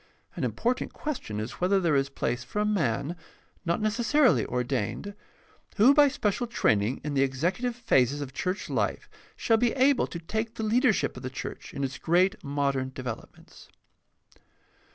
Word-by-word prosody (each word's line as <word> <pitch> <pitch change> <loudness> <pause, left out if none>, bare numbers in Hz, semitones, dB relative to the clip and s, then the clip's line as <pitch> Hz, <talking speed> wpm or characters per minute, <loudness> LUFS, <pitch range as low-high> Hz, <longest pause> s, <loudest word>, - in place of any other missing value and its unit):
An - - -4
important 250 +2 -1
question 245 - -4
is 110 +9 -6
whether 190 +2 +3
there 170 -5 +2
is 135 0 +1
place 120 -3 -2
for 125 - -8
a 210 - +2
man, 160 - 0 0.5
not 170 +3 +1
necessarily 225 - +3
ordained, 125 - -2 0.6
who 235 +7 +6
by 290 0 +6
special 240 -4 -1
training 110 - +1
in 150 0 -3
the 135 - +2
executive 170 - 0
phases 145 - +2
of 140 -3 -6
church 185 +7 -2
life - - -1 0.3
shall 225 - +2
be 240 0 +2
able 270 +1 +3
to - - -6
take 220 +7 -3
the 220 - -4
leadership 230 +1 +2
of - - -8
the 130 - -4
church 130 - -7
in 140 - -4
its 130 -1 -3
great 185 +5 +2
modern 140 -2 -1
develop 125 -3 -6
ments. - - -17
170 Hz, 165 wpm, -27 LUFS, -, 0.6 s, who